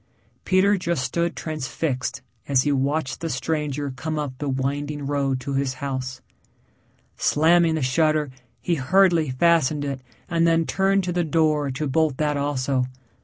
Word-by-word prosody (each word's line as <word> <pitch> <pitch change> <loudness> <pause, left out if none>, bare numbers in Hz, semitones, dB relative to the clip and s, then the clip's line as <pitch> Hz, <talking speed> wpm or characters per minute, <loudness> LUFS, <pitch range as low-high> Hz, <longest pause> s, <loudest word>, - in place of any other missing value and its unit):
Peter 195 +2 +3
just 170 -6 -1
stood 170 +4 -1
transfixed 130 -3 -3 0.2
as 135 -2 +3
he 145 - +1
watched 140 0 -1
the 165 - -2
stranger 145 -1 -2
come 155 +5 -4
up 145 -3 -3
the 145 - -2
winding 140 +2 -2
road 140 -2 0
to 140 +2 -5
his 135 -1 -1
house. 130 -2 -4 1.0
Slamming 165 +2 +3
the 155 - -1
shutter 150 +2 +1 0.3
he 175 - 0
hurriedly 170 +1 +3
fastened 150 +1 +2
it 135 -2 -4 0.3
and 170 -1 +2
then 165 0 +3
turned 195 +2 +1
to 180 - -2
the 175 0 +1
door 155 -2 +1
to 135 +3 -3
bolt 150 0 +1
that 150 -1 0
also. 140 -2 0
150 Hz, 155 wpm, -23 LUFS, 135-165 Hz, 1.0 s, Peter